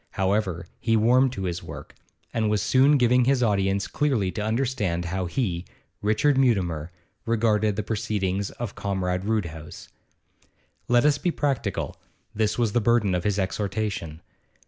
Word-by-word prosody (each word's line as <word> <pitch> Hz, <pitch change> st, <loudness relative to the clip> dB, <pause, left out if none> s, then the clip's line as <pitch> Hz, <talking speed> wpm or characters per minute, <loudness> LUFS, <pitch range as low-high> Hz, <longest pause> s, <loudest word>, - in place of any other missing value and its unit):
However, 95 Hz, -3 st, 0 dB
he 115 Hz, -1 st, +2 dB
warmed 125 Hz, +4 st, +4 dB
to 95 Hz, -, -5 dB
his 90 Hz, -1 st, -3 dB
work, -, -, -9 dB, 0.4 s
and 110 Hz, -2 st, +1 dB
was 105 Hz, -1 st, +1 dB
soon 135 Hz, +3 st, +4 dB
giving 125 Hz, 0 st, +4 dB
his 130 Hz, -1 st, +2 dB
audience 100 Hz, -2 st, +1 dB
clearly 125 Hz, -11 st, 0 dB
to 95 Hz, -, -4 dB
understand 110 Hz, -6 st, -1 dB
how 95 Hz, +1 st, -2 dB
he, 90 Hz, -5 st, -2 dB, 0.4 s
Richard 130 Hz, +7 st, +2 dB
Mutimer, 90 Hz, -, +1 dB, 0.4 s
regarded 110 Hz, -2 st, +2 dB
the 110 Hz, -, -2 dB
proceedings 100 Hz, -2 st, -1 dB
of 120 Hz, -4 st, -6 dB
Comrade 95 Hz, -2 st, -2 dB
Roodhouse. 85 Hz, -8 st, -4 dB, 1.0 s
Let 120 Hz, +2 st, +4 dB
us 145 Hz, -1 st, +3 dB
be 180 Hz, -, 0 dB
practical 135 Hz, -, -2 dB, 0.4 s
this 105 Hz, 0 st, 0 dB
was 115 Hz, -3 st, +1 dB
the 120 Hz, -, +1 dB
burden 115 Hz, -4 st, +2 dB
of 90 Hz, -1 st, -1 dB
his 105 Hz, -1 st, +1 dB
exhortation. 95 Hz, -4 st, -3 dB
105 Hz, 145 wpm, -25 LUFS, 95-120 Hz, 1.0 s, warmed